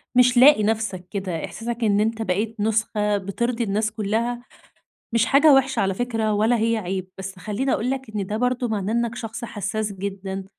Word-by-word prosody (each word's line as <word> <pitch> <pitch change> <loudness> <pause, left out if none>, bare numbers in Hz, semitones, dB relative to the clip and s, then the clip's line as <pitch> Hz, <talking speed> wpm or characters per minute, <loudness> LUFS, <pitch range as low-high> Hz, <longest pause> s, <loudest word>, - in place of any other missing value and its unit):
مش 250 0 +5
لاقي 255 -4 +7
نفسك 215 -4 -1
كده. 190 -5 -3
إحساسك 235 +1 -5
إن 205 -2 +3
أنت 225 +1 0
بقيت 215 +3 -1
نسخة 210 -1 +1
بترضي 235 +5 -2
الناس 215 +1 0
كلّها 225 +3 -1 0.7
مش 230 0 +3
حاجة 285 +3 +6
وحشة 270 0 +3
على 195 -1 +1
فكرة، 225 -2 -1
ولا 220 +4 +2
هي 230 +1 +1
عيب، 185 -2 -3
بس 190 0 -7
خلّيني 215 +8 -2
أقول 245 +4 0
لك 265 -4 -4
إن 205 -3 -3
ده 210 - -3
برضو 250 +1 0
معناه 210 -1 -2
إنّك 235 -1 0
شخص 230 0 -6
حسّاس 210 0 -3
جدًا، 195 0 -5
220 Hz, 180 wpm, -23 LUFS, 200-235 Hz, 0.7 s, لاقي